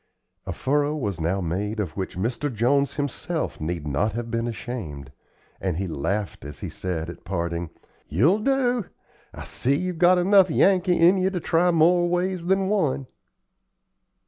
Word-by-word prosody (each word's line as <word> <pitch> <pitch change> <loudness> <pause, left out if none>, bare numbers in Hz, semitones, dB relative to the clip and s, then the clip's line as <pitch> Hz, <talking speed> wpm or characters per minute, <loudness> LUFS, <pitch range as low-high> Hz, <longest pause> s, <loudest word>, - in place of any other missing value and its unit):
A - - -2
furrow 145 +2 0
was 100 - -3
now 90 +4 0
made 100 +6 -2
of 95 -6 -2
which 95 -2 -4
Mr. 120 +8 -2
Jones 130 +5 +1
himself 145 - -3
need 80 -1 -3
not 80 +10 0
have 115 0 -4
been 115 0 -1
ashamed; 95 - -6 0.5
and 90 -4 -2
he 95 - -1
laughed 95 +6 -3
as 75 0 -9
he - - -4
said, 85 -3 -4
at 85 - -9
parting 85 -2 -3 0.4
"You'll 145 - +3
do. 250 -2 +1 0.5
I - - -9
see 135 +3 0
you've 180 0 -3
got 180 +1 +6
enough 190 +1 +5
Yankee 180 +2 +3
in 175 +3 +5
you 185 +1 +2
to 190 -2 -3
try 170 +1 +2
more 175 +1 +4
ways 180 0 -1
than 190 0 +2
one." 155 -10 0
130 Hz, 165 wpm, -24 LUFS, -, 0.5 s, got